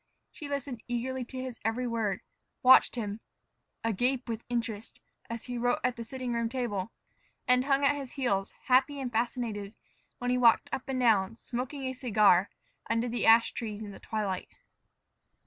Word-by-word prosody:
She 295 - -8
listened 275 -4 -4
eagerly 250 +2 -2
to 255 +2 -7
his 255 -2 -6
every 225 +3 0
word, 225 -5 -1 0.4
watched 255 0 +7
him, 210 -3 -3 0.6
agape 245 +4 0
with 230 -1 -4
interest, 225 -3 -3 0.3
as 230 -1 -5
he 245 -1 -4
wrote 245 +1 +2
at 250 -1 +1
the 235 - -6
sitting 250 +1 -4
room 235 -1 0
table, 230 -5 -2 0.6
and 250 +1 +4
hung 280 0 +3
at 290 - +4
his 275 -3 -7
heels, 200 -8 0
happy 265 +3 +3
and 255 -2 -3
fascinated, 225 -3 -2 0.4
when 245 -1 -1
he 250 - +2
walked 235 -2 +5
up 265 - -4
and 260 -1 -1
down, 225 -4 +3
smoking 255 +4 -5
a 260 0 -2
cigar, 210 -7 +4 0.4
under 230 +1 +1
the 240 -1 -1
ash 230 +1 +6
trees 220 -2 -5
in 205 - -7
the - - -11
twilight. 205 -4 -3
240 Hz, 170 wpm, -30 LUFS, 225-255 Hz, 0.6 s, watched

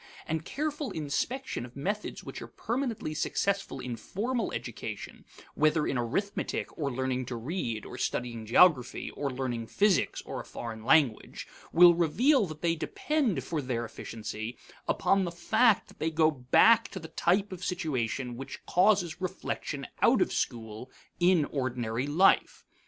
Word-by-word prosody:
And 160 0 -2
careful 295 - -3
inspection 160 - -2
of 125 0 -11
methods 200 +9 -3
which - - -8
are - - -7
permanently 235 - -3
successful 195 0 -1
in 125 -2 -4
formal 225 - -2
education, - - -6 0.3
whether 155 0 +2
in - - -1
arithmetic 145 - -2
or 140 -3 -2
learning 130 0 -2
to 125 - -4
read, 115 - -3
or - - -8
studying 115 -3 -3
geography, 130 0 +4
or 145 - -3
learning 125 -3 -3
physics 200 - +2
or - - -5
a - - -11
foreign 110 -2 -7
language, 135 -3 +2 0.2
will 175 +1 +8
reveal 210 - +3
that 155 0 -9
they 170 -1 +3
depend 230 - -1
for 155 +2 -2
their 120 -3 -2
efficiency 110 +1 -6 0.3
upon 195 0 +2
the 175 - -2
fact 220 +5 +3
that - - -18
they 160 - 0
go 160 0 +3
back 155 - +5
to 190 - -7
the 160 - -8
type 195 +4 +1
of 185 - -6
the - - -9
situation 130 - -2
which 135 +1 -8
causes 185 -3 +2
reflection 185 - -4 0.2
out - - +5
of - - +1
school 110 +1 -3 0.3
in 175 -3 +4
ordinary 125 -2 -2
life. 175 +7 +3
155 Hz, 155 wpm, -29 LUFS, 125-190 Hz, 0.3 s, will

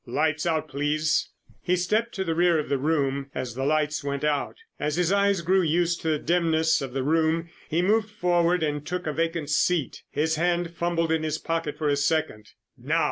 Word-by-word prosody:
Lights 155 +5 0
out, 160 -2 0
please!" 150 +2 0 0.3
He 180 - +1
stepped 215 +6 0
to 190 - -1
the 165 -3 -1
rear 170 0 +3
of 150 - -3
the 140 - +1
room 140 -2 0
as 130 -2 -4
the 135 +3 -4
lights 150 0 0
went 140 0 -3
out. 150 -2 0 0.2
As 150 0 -1
his 180 0 +1
eyes 200 -2 +2
grew 185 +3 +3
used 170 +1 +1
to 160 - -1
the 155 - +2
dimness 160 -1 +2
of 135 -2 -5
the 135 -1 -1
room 160 +3 +1 0.2
he 165 +3 +1
moved 215 +3 +2
forward 175 -3 +1
and 150 -1 -1
took 180 +3 -4
a 155 - -2
vacant 165 -1 -2
seat. 165 0 +1
His 160 +1 0
hand 175 0 0
fumbled 170 -1 0
in 160 -1 +1
his 155 -1 -1
pocket 165 -2 -3
for 155 - -1
a 145 - +3
second. 145 -7 -1 0.3
"Now!" - - -1
160 Hz, 205 wpm, -25 LUFS, 150-175 Hz, 0.3 s, rear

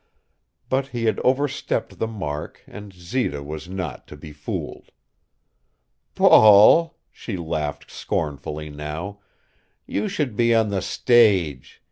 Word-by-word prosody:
But 135 +1 -1
he 120 -3 -5
had 110 - +1
overstepped 135 +2 -1
the 115 - -1
mark 80 -10 -6
and 105 -1 -11
Zita 90 - -3
was 75 +4 -8
not 95 -1 -6
to - - -11
be 75 - -11
fooled. 75 0 -7 1.3
"Paul" 110 +11 +6
she 105 -6 -7
laughed 80 -3 -4
scornfully 75 0 -4
now 75 +7 -6 0.7
"you 105 - -2
should 135 -8 -3
be 115 +1 +3
on 110 -2 +2
the 100 -2 -2
stage. 95 - +2
100 Hz, 120 wpm, -22 LUFS, 75-115 Hz, 1.3 s, Paul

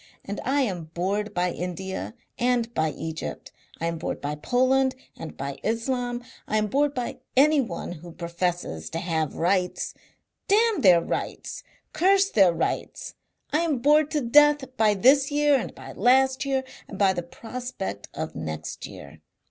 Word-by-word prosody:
And 200 +1 -4
I 280 +2 +2
am 185 -10 -2
bored 200 +4 -1
by 180 0 0
India 190 +5 -5 0.2
and 240 -1 +1
by 160 -6 +1
Egypt. 160 +1 -6 0.3
I 165 - -2
am 165 -1 -2
bored - - -3
by 145 +1 -3
Poland 255 - +2 0.2
and 165 - -9
by 140 0 -5
Islam. 245 +2 -1 0.2
I 215 - +1
am 215 - +2
bored 285 +6 +1
by 245 -2 -3 0.2
anyone 270 - +3
who 175 0 -9
professes 170 - -3
to - - -4
have 160 -3 -1
rights. 180 +1 0 0.5
Damn 440 +1 +3
their 180 -4 +7
rights! - - -4 0.3
Curse 390 +4 +3
their 195 -5 +5
rights! 165 0 -3 0.4
I 305 - +4
am 325 -5 +1
bored 300 +4 +4
to 300 -2 0
death 290 +1 +4
by 215 -1 +3
this 270 +7 +5
year 295 0 +3
and 255 - -2
by - - -10
last 265 +2 +3
year 270 -1 0 0.2
and 195 - -8
by 195 -1 +4
the 175 - -2
prospect 225 - -6
of - - -4
next 80 -1 -5
year. 75 +2 -12
220 Hz, 160 wpm, -25 LUFS, 170-270 Hz, 0.5 s, their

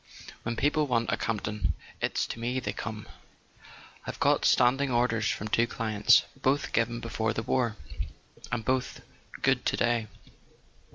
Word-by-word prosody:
When 115 +1 -3
people 150 +4 +2
want 115 -3 +1
a - - +3
Camp 115 -2 -2
ton 105 0 -1 0.3
it's - - 0
to - - -6
me 125 +3 -1
they 125 - -3
come. 110 -2 -6 1.0
I've - - -5
got - - +3
standing 135 +3 +4
orders 120 -3 +2
from 105 - -2
two 115 +2 +2
clients... 110 -3 +4
both 135 +2 0
given 120 +1 +1
before 110 -1 -1
the 110 - -2
war, 115 -2 0 0.7
and 120 -3 -2
both 130 0 -1 0.4
good - - +3
to - - +1
day." 120 -2 +1
115 Hz, 155 wpm, -29 LUFS, 110-125 Hz, 1.0 s, standing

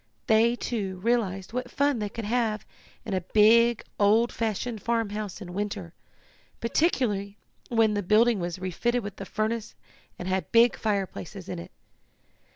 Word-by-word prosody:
They, 225 +2 +4
too, 200 -7 -3
realized 205 -5 0
what 250 0 -3
fun 280 -1 +1
they 210 -1 -2
could 230 +1 -6
have 220 -2 0 0.4
in 215 - -3
a 185 - 0
big, 225 +5 +4 0.2
old 220 +4 +4
fashioned 225 0 -2
farmhouse 215 -3 -2
in 175 -2 -8
winter, 200 -3 -4 0.7
particularly 225 - 0 0.3
when 225 -2 +3
the 205 - 0
building 215 +3 +4
was 175 0 -3
refitted 220 +7 -1
with 200 -1 -7
a - - -4
furnace, 215 +2 -2 0.4
and 180 - -6
had 190 0 -1
big 235 +1 +5
fireplaces 195 -2 -3
in 180 -2 -5
it. 170 - -9
215 Hz, 150 wpm, -27 LUFS, 195-235 Hz, 0.7 s, big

